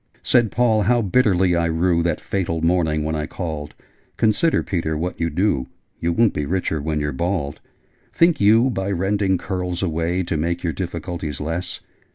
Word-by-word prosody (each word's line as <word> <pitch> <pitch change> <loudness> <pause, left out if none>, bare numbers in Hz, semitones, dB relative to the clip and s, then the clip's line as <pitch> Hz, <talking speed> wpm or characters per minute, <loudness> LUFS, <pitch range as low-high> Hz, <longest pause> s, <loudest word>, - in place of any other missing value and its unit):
Said 120 -3 +3
Paul 115 -3 +2
'How 120 +2 +2
bitterly 95 -4 +3
I 85 0 +1
rue 85 +1 +2
That 85 0 0
fatal 85 -4 -2
morning 80 -3 +1
when 80 +1 -2
I 75 -1 -2
called! 80 -5 -5 0.4
Consider, 115 +9 +2
Peter, 80 -4 -2
what 90 +3 -3
you 85 0 0
do! 80 -6 0 0.3
You 85 - 0
won't 115 +5 +3
be 75 -1 -2
richer 85 -3 -1
when 75 +1 -1
you're 75 0 -1
bald! 80 -1 -2 0.5
Think 170 -5 +3
you, 115 +5 +5
by 95 -3 -2
rending 95 +1 +1
curls 90 -1 -3
away, 85 +1 0
To 85 -2 -2
make 85 +3 -2
your 85 -2 -1
difficulties 85 -4 -4
less? 80 +4 -4
85 Hz, 175 wpm, -21 LUFS, 80-100 Hz, 0.5 s, you